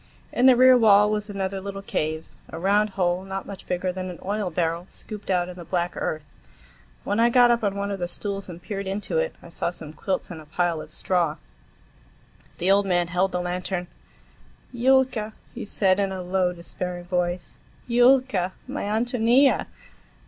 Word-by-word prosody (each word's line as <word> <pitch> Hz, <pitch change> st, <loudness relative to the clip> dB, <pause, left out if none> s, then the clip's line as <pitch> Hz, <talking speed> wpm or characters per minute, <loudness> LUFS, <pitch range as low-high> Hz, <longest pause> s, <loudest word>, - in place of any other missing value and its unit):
In 250 Hz, +2 st, +4 dB
the 260 Hz, -, +8 dB
rear 255 Hz, +1 st, +7 dB
wall 210 Hz, -2 st, +6 dB
was 210 Hz, 0 st, -2 dB
another 195 Hz, -1 st, -3 dB
little 195 Hz, 0 st, -6 dB
cave; 155 Hz, -3 st, -2 dB, 0.2 s
a -, -, -7 dB
round 205 Hz, +4 st, +2 dB
hole, 180 Hz, 0 st, +1 dB
not 195 Hz, 0 st, -5 dB
much 200 Hz, -2 st, -9 dB
bigger 180 Hz, +1 st, -1 dB
than 185 Hz, 0 st, -5 dB
an 180 Hz, -, -7 dB
oil 205 Hz, -1 st, -1 dB
barrel, 170 Hz, 0 st, -1 dB
scooped 210 Hz, -2 st, -9 dB
out 180 Hz, -2 st, +2 dB
in 180 Hz, -, -8 dB
the 175 Hz, -, -9 dB
black 175 Hz, +1 st, -1 dB
earth. 155 Hz, -1 st, -3 dB, 0.8 s
When 205 Hz, +2 st, -1 dB
I 235 Hz, +1 st, +5 dB
got 245 Hz, 0 st, +6 dB
up 235 Hz, -1 st, +1 dB
on 200 Hz, -1 st, 0 dB
one 200 Hz, 0 st, -2 dB
of 195 Hz, -, -3 dB
the 175 Hz, -, -1 dB
stools 195 Hz, +2 st, -5 dB
and 170 Hz, -1 st, -8 dB
peered 195 Hz, +2 st, -5 dB
into 205 Hz, -, -1 dB
it, -, -, -1 dB
I -, -, -11 dB
saw -, -, -2 dB
some 160 Hz, -3 st, -9 dB
quilts 185 Hz, +3 st, -3 dB
and 160 Hz, -3 st, -7 dB
a 155 Hz, -, -16 dB
pile 170 Hz, 0 st, 0 dB
of -, -, -10 dB
straw. 170 Hz, -4 st, 0 dB, 1.2 s
The 180 Hz, +3 st, +2 dB
old 200 Hz, 0 st, +4 dB
man 175 Hz, -2 st, +1 dB
held 185 Hz, +2 st, +1 dB
the 180 Hz, -, -1 dB
lantern. 180 Hz, 0 st, -3 dB, 0.9 s
"Yulka," 250 Hz, -3 st, +2 dB, 0.2 s
he -, -, -6 dB
said 195 Hz, -2 st, +2 dB
in 195 Hz, -1 st, +1 dB
a 185 Hz, -1 st, -4 dB
low, 180 Hz, 0 st, +1 dB
despairing 175 Hz, +1 st, -6 dB
voice, 175 Hz, -1 st, -2 dB, 0.3 s
"Yulka; 245 Hz, -6 st, +3 dB
my 275 Hz, +3 st, -4 dB
Ántonia!" 240 Hz, +5 st, +3 dB
190 Hz, 185 wpm, -25 LUFS, 180-210 Hz, 1.2 s, the